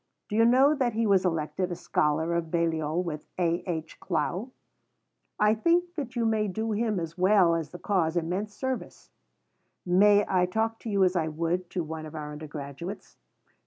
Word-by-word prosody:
Do 210 - -3
you 225 +1 +5
know 260 +5 +5
that 255 -6 0
he 225 +1 0
was 195 -3 +3
elected 175 +2 -1
a - - -2
scholar 160 +1 0
of 170 -1 -1
Balliol 165 0 0
with 155 -4 -6
A. 170 -1 0
H. 160 -2 -4
Clough? 180 - -2 0.9
I 210 0 +5
think 345 +9 +1
that 270 -7 -5
you 235 -1 0
may 220 -1 +1
do 220 +3 -2
him 215 -2 0
as 165 +1 -6
well 185 -2 +5
as 165 -2 -2
the 175 - -9
cause 175 -2 0
immense 185 +5 -2
service. 260 +2 -5 0.7
May 205 +3 +5
I 180 -1 +2
talk 225 +4 -1
to 230 - -6
you 200 -2 +3
as 185 0 +2
I 165 -3 +1
would 170 +3 -2
to 180 -1 -2
one 160 0 -6
of 155 - -11
our 150 -1 -5
undergraduates? 150 +4 -8
180 Hz, 185 wpm, -27 LUFS, 165-215 Hz, 0.9 s, you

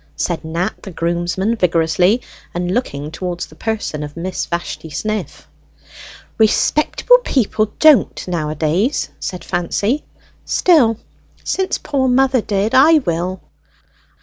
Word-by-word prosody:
said 170 -2 -2
Nat 170 +5 -3
the 200 - -8
groomsman 175 +5 -1
vigorously, 180 +3 +2 0.4
and 175 +1 -1
looking 150 - -3
towards 175 +1 -4
the 155 - -17
person 215 -6 -3
of 150 +1 -7
Miss 185 +2 -3
Vashti 170 -1 -4
Sniff. 215 +4 -4 0.9
"Respectable 305 - +3
people 220 - 0
don't 300 -13 +4
nowadays," 165 - -1
said 180 - -5
Fancy. 200 - -1 0.4
"Still, 260 - +3 0.5
since 380 -1 -1
poor 275 -3 -1
mother 260 0 +3
did, 205 +1 -1
I 290 +5 +7
will." 175 +2 -2
190 Hz, 115 wpm, -18 LUFS, 170-240 Hz, 0.9 s, I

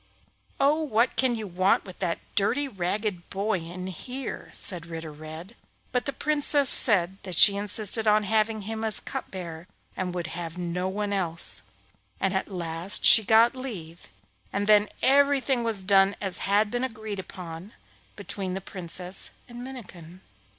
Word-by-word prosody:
'Oh, 290 +3 +3
what 245 -5 +1
can 255 -2 +1
you 220 -2 -5
want 185 0 +1
with 185 -2 -12
that 175 -3 -1 0.2
dirty, 280 +8 +1
ragged 200 -3 -3
boy, 200 0 -1
in 175 +2 -8
here?' 250 +8 -6
said 170 -3 -4
Ritter 165 -1 -7
Red, 155 +7 -10 0.4
but 250 - -1
the - - -1
Princess 290 -1 +2
said 190 -4 +6
that 185 -4 -4
she 200 +1 +10
insisted 210 +2 0
on 210 0 +4
having 215 +1 0
him 220 +2 -5
as 220 -1 +1
cup 270 -1 -6
bearer 170 -2 -8 0.3
and 185 -1 -3
would 175 -1 -3
have 165 0 -6
no 180 +1 -3
one 205 +1 -3
else; 170 -4 +1 0.6
and 190 -1 0
at 190 - -1
last 170 0 -2
she 220 - +9
got 225 +5 +4
leave, 185 -11 -8 0.4
and 200 +1 -2
then 210 0 +5 0.2
everything 275 -2 +3
was 220 -4 -1
done 195 +1 +4
as 190 -3 -2
had 205 +1 +2
been 245 +1 -2
agreed 220 -5 -5
on 175 +3 -9 0.4
between 190 -2 -5
the - - -3
Princess 180 0 -4 0.2
and 240 0 -9
Minnikin. 185 -9 -11
200 Hz, 160 wpm, -26 LUFS, 180-225 Hz, 0.6 s, she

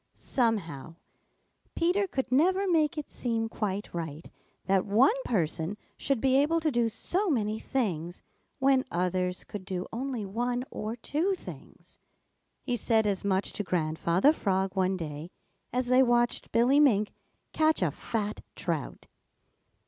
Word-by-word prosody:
Somehow 170 - -1 0.8
Peter 365 +4 +2
could 265 -6 -3
never 370 +9 +3
make 325 -2 +2
it 300 - -5
seem 230 -2 -1
quite 205 -2 -3
right 160 -2 -6 0.3
that 190 -1 +3
one 230 - +4
person 170 -1 -1 0.2
should 275 -4 -1
be 260 +2 +3
able 305 +4 +3
to 315 -1 0
do 240 -2 +2
so 360 - 0
many 220 -6 0
things 175 -11 -2 0.3
when 265 -1 +3
others 180 +1 -1
could 205 -2 -7
do 185 -1 -4
only 245 -2 -3
one 245 +5 -1
or 215 +2 -4
two 315 - -1
things. - - -12 0.6
He 245 -2 -1
said 225 -2 +2
as 200 -2 0
much 195 -1 0
to 205 - -3
Grandfather 170 - +2
Frog 190 -7 -1
one 190 0 +1
day, 155 -1 -6 0.4
as 250 0 0
they 255 +1 +5
watched 240 -1 +2
Billy 245 +5 +4
Mink 215 -8 +4 0.4
catch 315 -8 +3
a 165 - +1
fat 210 +6 -3
trout. 165 -7 -4
225 Hz, 140 wpm, -29 LUFS, 185-265 Hz, 0.8 s, they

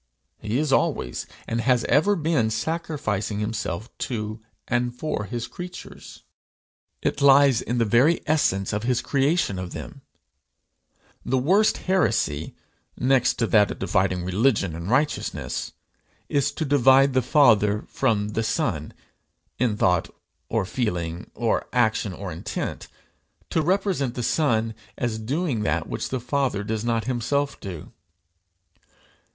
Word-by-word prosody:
He 110 +3 -2
is 150 -1 +1
always, - - 0 0.2
and 115 0 -1
has 125 0 +2
ever 200 +8 +3
been, 155 - +1
sacrificing 110 - -2
himself 105 -1 -4
to 110 -2 -4 0.3
and 120 0 0
for 140 -9 -3
his 120 +1 -4
creatures. 180 -1 -10 0.8
It - - -1
lies 140 -3 +6
in 120 - -2
the 115 - +2
very 125 +10 +4
essence 100 -12 +1
of 105 - -1
his 125 +1 +1
creation 140 - +1
of 90 -1 -6
them. - - -8 1.2
The 130 - 0
worst 190 +12 +3
heresy, 110 - 0 0.4
next 130 0 +3
to 115 - 0
that 105 -2 +6
of - - -5
dividing 95 -2 0
religion 100 -1 +1
and 85 +3 -6
righteousness, 145 +5 -1 0.6
is 140 -1 +1
to 160 - -2
divide 135 -1 +5
the 130 - +3
Father 110 -6 +4
from 105 -6 0
the 110 +2 -1
Son 110 - -1 0.7
in 115 -4 +1
thought 90 -4 +2 0.4
or 110 -4 0
feeling 90 -6 -3
or 115 -1 0
action 110 -4 +1
or 95 0 -6
intent; 80 - -5 0.6
to 160 - +2
represent 180 - 0
the 125 - -3
Son 115 -6 +1 0.2
as 115 -2 -2
doing 135 +1 -1
that 105 - 0
which - - -4
the 130 - -2
Father 125 -4 -1
does 110 +1 -3
not 115 -1 0
himself 130 +4 -1
do. 90 -6 -8
120 Hz, 135 wpm, -24 LUFS, 105-140 Hz, 1.2 s, lies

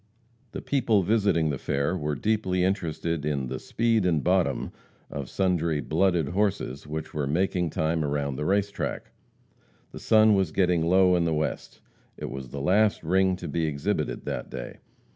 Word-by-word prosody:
The - - -6
people 115 -8 +2
visiting 100 -6 +2
the 70 - -4
fair 70 +6 -1
were 75 -4 -2
deeply 95 -1 0
interested 85 -4 -1
in 70 -4 -2
"the 65 0 -4
speed 115 -2 +1
and 80 -5 +1
bottom" 90 0 +1 0.4
of 70 -2 -5
sundry 85 -5 0
"blooded 85 -1 +1
horses" 95 -9 -1
which 80 +1 -5
were 75 -2 -2
making 90 +2 0
time 80 +1 0
around 70 -1 -1
the 75 - -3
race 100 +2 +1
track. - - -4 0.8
The - - -9
sun 110 -1 +5
was 95 -5 +1
getting 90 -2 +2
low 90 +2 +4
in 85 -1 +1
the 80 -1 +1
west. 75 0 -4 0.4
It - - -6
was 65 -1 -7
the 70 - -6
last 100 +7 +2
"ring" 95 +3 +2
to 90 - -7
be 80 -1 -1
exhibited 70 -2 -2
that - - -4
day. 60 -2 -7
85 Hz, 170 wpm, -26 LUFS, 75-95 Hz, 0.8 s, sun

